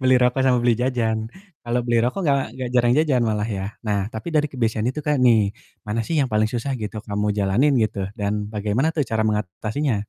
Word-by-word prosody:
beli 130 0 +4
rokok 125 +1 +2
sama 125 -1 +4
beli 120 - +5
jajan. 115 -3 0 0.3
Kalau 120 +1 0
beli 120 -1 +2
rokok 125 +10 -1
enggak 140 -2 +3 0.2
enggak 130 -1 -3
jarang 120 -1 +4
jajan 140 -6 +2
malah 105 +1 -1
ya. 95 - -3 0.2
Nah, 105 -1 +1
tapi 110 +8 -7
dari 150 0 +2
kebiasaan 115 -2 0
itu 140 +4 -3
Kak, 150 -3 +1
nih, 110 -5 +4 0.3
mana 105 +2 -1
sih 165 - -1
yang 135 - +1
paling 110 0 +2
susah 120 +4 -3
gitu, 105 +1 -5
kamu 105 0 -2
jalanin 105 +9 +2
gitu, 105 -4 0
dan 100 -1 -1 0.2
bagaimana 105 +7 0
tuh 150 - +2
cara 110 -3 -2
mengatasinya? 110 +7 -1
120 Hz, 210 wpm, -22 LUFS, 105-130 Hz, 0.3 s, beli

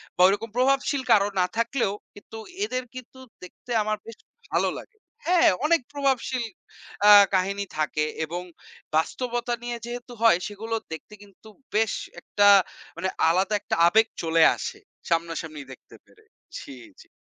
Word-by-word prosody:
বা 180 - 0
ওইরকম 205 +3 -1
প্রভাবশীল 275 +1 +2
কারো 200 -1 +5
না 180 - +4
থাকলেও 235 -3 0 0.2
কিন্তু 205 +2 -12 0.3
এদের 255 -8 -3
কিন্তু 255 +1 -11 0.2
দেখতে 240 +6 -12
আমার 215 0 -1
বেশ 230 -1 -10 0.4
ভালো - - +2
লাগে। 460 - -16 0.3
হ্যাঁ, 355 -1 +5 0.2
অনেক 330 -2 +3
প্রভাবশীল 265 -3 0 0.7
আ - - +10 0.2
কাহিনী 195 +2 0
থাকে 150 0 0 0.2
এবং 175 +3 -5 0.5
বাস্তবতা 240 +8 -1
নিয়ে 240 0 -4
যেহেতু 245 +1 -7
হয় 225 -7 +6
সেগুলো 220 +2 -5 0.2
দেখতে 160 - -10
কিন্তু 200 +2 -19 0.3
বেশ 220 0 +2 0.3
একটা 205 0 +2 0.5
মানে 190 +2 -1 0.2
আলাদা 185 +5 +1
একটা - - -2
আবেগ 220 +5 +4 0.2
চলে 165 0 +3
আসে - - -6 0.3
সামনাসামনি 165 -2 -2
দেখতে - - -17
পেরে। - - -24 0.4
জি, 135 - -10 0.3
জি। - - -19
215 Hz, 145 wpm, -25 LUFS, 180-245 Hz, 0.7 s, আ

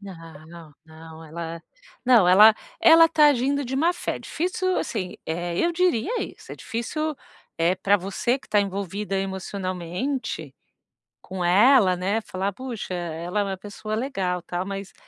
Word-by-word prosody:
Não, 165 -4 -12
não 160 0 -13
ela 165 +1 -7 0.4
não 235 -8 +5
ela 210 +4 +8 0.3
ela 330 0 +7
tá 315 -2 +5
agindo 280 +1 +1
de 260 +1 -4
má-fé, 340 +5 0
difícil 370 +2 -2
assim, 185 -2 -4
eh, 170 +1 -3
eu 345 - +2
diria 365 - +1
isso, - - -9
é - - -8
difícil, 305 +7 -3 0.4
eh, 170 +2 +2
pra 195 +2 +2
você 200 +7 -1
que - - -21
tá 210 - +3
envolvida 200 0 -3
emocionalmente 190 +5 -4 0.7
com 185 -1 -5
ela, 200 +1 +5
né, 195 +5 -1
falar: 195 -1 -3
"Puxa, 240 -5 -6
ela 175 +3 -3
é - - +1
uma 195 -1 -4
pessoa 205 +2 -7
legal, 195 -8 -2
tal." 175 +1 -4
Mas, 195 0 -6
195 Hz, 145 wpm, -24 LUFS, 175-255 Hz, 0.7 s, ela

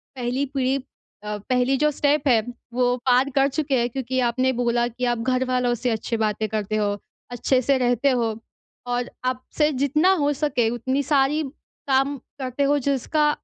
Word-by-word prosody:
पहली 255 +2 -1
पीढ़ी 265 -1 +1 0.5
अ 210 0 -3
पहली 255 +1 +2
जो 300 +1 +3
स्टेप 290 0 +1 0.5
वो 245 0 +2
पार 255 +2 +4
कर 270 0 +4
चुके 285 0 -1
हैं। 240 +1 0
क्योंकि 260 +1 -2
आपने 255 +2 +1
बोला 240 -1 +1
कि 245 +1 -4
आप 240 - -1
घर 255 +2 +1
वालों 250 -1 +1
से 245 +2 -2
अच्छी 225 +1 -2
बातें 215 0 0
करते 215 -1 -2
हो, 210 -1 +1 0.4
अच्छे 255 +2 +1
से 275 +2 +2
रहते 245 +1 +2
हो, 235 -4 0 0.5
और 245 0 -1 0.2
आपसे 255 +4 0
जितना 300 +6 +3
हो 290 0 +2
सके 265 -5 0
उतनी 260 +4 -1
सारी 285 +2 +2 0.5
काम 270 +1 +2 0.2
करते 260 +1 -2
हो 285 +1 +3
जिसका 280 +3 +1
255 Hz, 170 wpm, -23 LUFS, 240-275 Hz, 0.5 s, पार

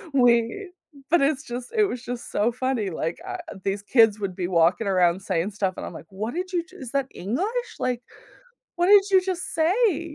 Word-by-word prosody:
we 245 - +3 0.4
but 345 -2 +5
it's 280 +1 +1
just 245 0 -6
it 430 - +6
was 250 - -4
just 245 -1 -6
so 220 +4 +2
funny, 250 -4 -1
like, 165 0 -3
i 380 - -5
uh - - -3 0.3
these 200 +1 -2
kids 225 -2 +4
would 195 -3 -3
be 180 -1 -2
walking 175 +4 +2
around 180 -1 +3
saying 190 0 -1
stuff 195 -2 -1
and - - -5
I'm, - - -7
like, 160 - -10
"What 210 +4 -4
did 365 +3 -4
you 345 -2 +1
just 345 - -22
is 235 - -8
that 275 -1 +1
English? 420 - -3
Like, 250 -1 -1 0.8
what 350 - +2
did 405 0 +8
you 380 -1 +5
just 365 -2 -3
say?" 335 -2 +1
245 Hz, 215 wpm, -24 LUFS, -, 0.8 s, did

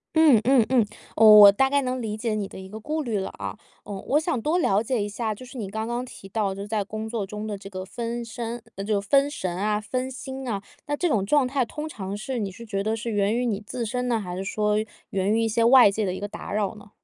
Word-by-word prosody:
嗯 295 -9 +6
嗯 255 -3 +4
嗯， 245 -5 +4 0.3
我 215 -1 +9
我 200 -1 +11
大 265 +6 +2
概 280 -1 +2
能 255 0 -2
理 215 -1 -3
解 225 -1 -1
你 205 -2 -2
的 - - -10
一 190 - -9
个 215 +3 -8
顾 305 +6 -2
虑 220 -5 -1
了 190 - -3
啊， - - -5 0.3
嗯， 195 -2 -6
我 295 +3 +3
想 315 -7 -1
多 315 +7 +1
了 205 - +2
解 230 -2 -1
一 - - -2
下， 215 +1 -3
就 255 - -11
是 270 - -13
你 195 -3 -4
刚 220 +2 -3
刚 240 +1 -2
提 220 -6 -11
到， 195 -1 -1
就 200 - -6
是 - - -8
在 210 -1 0
工 215 +2 -5
作 220 -4 -3
中 210 +1 -6
的 210 -1 -3
这 195 0 -10
个 185 -1 -6
分 235 +3 -4
身 230 +1 -5 0.2
呃， 195 - -5
就 205 -1 +1
分 275 +8 +3
神 185 -11 -4
啊、 210 +2 0
分 255 +5 -3
心 265 0 -7
啊， 200 -2 -3 0.2
那 290 - -1
这 355 - +1
种 220 - +1
状 270 +5 +3
态 265 0 +1
通 300 +6 -5
常 200 -7 -5
是 245 +3 -4
你 200 -3 -2
是 230 +5 -11
觉 195 -2 -2
得 220 +1 0
是 230 +1 -4
源 205 +1 +1
于 250 - 0
你 215 -3 -1
自 230 +3 -4
身 250 +3 -2
呢？ 235 -2 +1
还 180 -4 -5
是 190 - -3
说 210 +1 0 0.3
源 195 +1 0
于 225 - +2
一 - - +2
些 225 +1 +1
外 240 -3 +7
界 210 +1 -1
的 180 - -1
一 - - -6
个 205 - -4
打 - - -8
扰 210 0 0
呢？ 205 -1 -14
220 Hz, 305 characters per minute, -25 LUFS, 205-250 Hz, 0.3 s, 我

